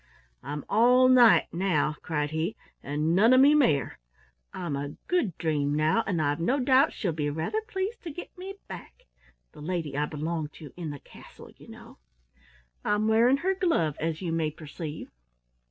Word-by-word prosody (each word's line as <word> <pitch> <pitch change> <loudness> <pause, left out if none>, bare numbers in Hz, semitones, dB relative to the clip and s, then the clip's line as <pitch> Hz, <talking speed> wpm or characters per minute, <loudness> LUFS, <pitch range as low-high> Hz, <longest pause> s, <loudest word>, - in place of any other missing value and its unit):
"I'm 145 0 -6
all 250 +4 +5
knight 245 -3 +5
now," 170 -4 0
cried 150 -2 -2
he, 160 +6 -2 0.3
"and 150 +4 -1
none 225 +6 +5
of 255 - +6
me 280 +3 +7
mare. 155 - +2 0.5
I'm 170 -6 -4
a 140 +1 -5
Good 260 - 0
Dream 150 -3 0
now, 155 +9 +2
and 175 -4 0
I've 145 0 0
no 250 +12 +1
doubt 265 +3 +4
she'll 190 -7 -2
be 150 -2 -2
rather 160 - -2
pleased 425 0 -4
to 340 - -7
get 340 +4 -9
me 380 +2 -8
back 185 -2 -11 0.5
the - - -14
lady 160 -3 -3
I 150 +1 0
belong 155 +1 -3
to 150 -5 -12
in 170 -3 -5
the 145 - -6
castle, - - -15
you - - -17
know. - - -14 0.8
I'm 210 +1 +1
wearing 235 +4 +4
her 380 - +3
glove, 330 - 0
as 165 +2 -3
you 170 - -2
may 165 -1 0
perceive." 155 0 -8
170 Hz, 175 wpm, -27 LUFS, 150-250 Hz, 0.8 s, me